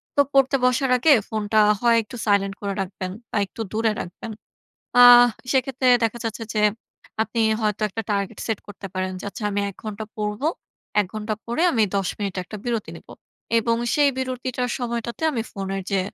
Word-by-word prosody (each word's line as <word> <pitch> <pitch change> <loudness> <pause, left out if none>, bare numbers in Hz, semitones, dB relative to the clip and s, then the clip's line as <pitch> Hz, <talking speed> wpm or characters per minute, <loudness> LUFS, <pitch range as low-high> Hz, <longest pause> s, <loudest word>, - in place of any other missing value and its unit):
তো 285 - +6
পড়তে 270 0 +4
বসার 255 +2 +2
আগে 300 +6 +4 0.2
ফোনটা 215 -1 0 0.2
হয় 235 -1 +4
একটু 230 +4 -11
সাইলেন্ট 200 -2 +2
করে 200 -1 -2
রাখবেন 185 -1 -5 0.2
বা - - -1
একটু 210 - -9
দূরে 225 0 +1
রাখবেন। 180 +5 -7 0.7
আ - - +9 0.5
সেক্ষেত্রে 265 -1 0 0.2
দেখা 230 +1 0
যাচ্ছে 225 0 -4
যে, 215 - +1 0.6
আপনি 230 +1 -3 0.2
হয়তো 210 -1 -1
একটা 225 +3 -4
টার্গেট 200 +1 -2
সেট 225 -3 -1
করতে 205 -1 -9
পারেন, 185 0 -2
যে - - -8
আচ্ছা 225 - -9
আমি 205 0 -1
১ 195 - -17
ঘণ্টা 215 0 -5
পড়বো। 210 +7 -1 0.5
১ 205 - -1
ঘন্টা 215 0 -2
পড়ে 240 +8 -1
আমি 225 - +3
১০ 195 -2 0
মিনিট 200 -3 -3
একটা 215 - -8
বিরতি 235 -3 -2
নিবো - - -14 0.5
এবং 230 +1 +1 0.2
সেই 290 -1 +4
বিরতিটার 255 -1 -2
সময়টাতে 235 +1 -4
আমি 235 -5 -1
ফোনের 195 0 -4
যে 195 -1 +2
220 Hz, 180 wpm, -23 LUFS, 200-245 Hz, 0.7 s, আ